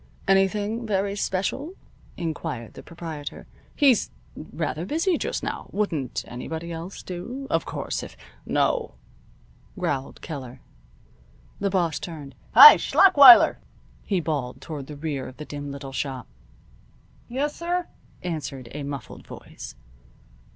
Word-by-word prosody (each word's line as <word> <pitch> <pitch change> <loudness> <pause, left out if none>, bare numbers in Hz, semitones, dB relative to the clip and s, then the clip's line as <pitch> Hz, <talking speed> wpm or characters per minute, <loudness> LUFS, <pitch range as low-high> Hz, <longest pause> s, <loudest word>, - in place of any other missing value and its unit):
"Anything 205 +4 +1
very 200 -1 0
special?" 205 - -2 0.4
inquired 155 -8 -5
the - - -10
proprietor. 160 -4 -8 0.3
"He's 270 -7 +4 0.3
rather 155 +1 -4
busy 330 - 0
just - - -3
now. - - -4
Wouldn't 160 - -2
anybody 160 +7 -6
else 165 +3 -7
do? 235 +10 -6
Of 165 - +1
course, - - -4
if - - -10 0.2
" - - -30 0.2
"No," - - -1 0.8
growled 135 -1 -3
Keller. 130 -5 -7 1.0
The 200 - 0
boss 170 -6 0
turned. 150 -5 -8 0.2
"Hi! 450 - +12
Schlachweiler!" 285 -10 +7 0.4
he 195 -3 0
bawled 145 -7 -3
toward 145 -5 -7
the 150 - -9
rear 145 -3 -4
of 130 - -12
the 150 - -7
dim 145 -1 -6
little 140 -1 -8
shop. 135 -1 -4 1.0
"Yessir," 340 +7 -2 0.4
answered 145 -8 -5
a 150 - -6
muffled 140 -2 -7
voice. - - -10
165 Hz, 125 wpm, -25 LUFS, 145-205 Hz, 1.0 s, Hi